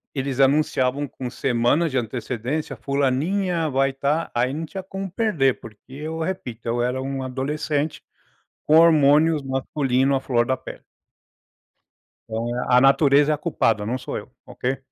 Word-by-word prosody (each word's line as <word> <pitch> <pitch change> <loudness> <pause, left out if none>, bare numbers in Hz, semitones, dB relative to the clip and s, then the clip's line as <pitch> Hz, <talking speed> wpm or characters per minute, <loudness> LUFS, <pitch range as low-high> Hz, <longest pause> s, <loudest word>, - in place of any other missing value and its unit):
E - - -2
eles 135 -1 -3
anunciavam 135 -1 +2
com 125 -2 -6
semanas 130 +7 +1
de 130 - -1
antecedência: 125 +4 -3
"Fulaninha 155 - 0
vai 135 0 +1
tá". 145 +4 -1
Aí, 125 +2 0
não 160 +3 -4
tinha 190 +5 -7
como 195 0 -6
perder, 170 - +1
porque, 110 +2 -14
eu 155 +3 -5
repito, 160 -10 -5
eu 120 +1 0
era 125 +2 -1
um 135 0 -4
adolescente 145 +3 -2 0.6
com 155 - +4
hormônios 155 -1 +5
masculino 135 0 0
à 135 - +2
flor 120 -3 +1
da 130 +1 0
pele. - - -10 1.4
Então, 115 +2 -3
é 125 - -2
a 125 - +6
natureza 140 +2 +5
é 150 - +2
a - - -10
culpada, 115 -9 0
não 125 +4 -1
sou 130 - -5
eu, - - -9
ok? 130 +1 -3
135 Hz, 160 wpm, -23 LUFS, 125-155 Hz, 1.4 s, a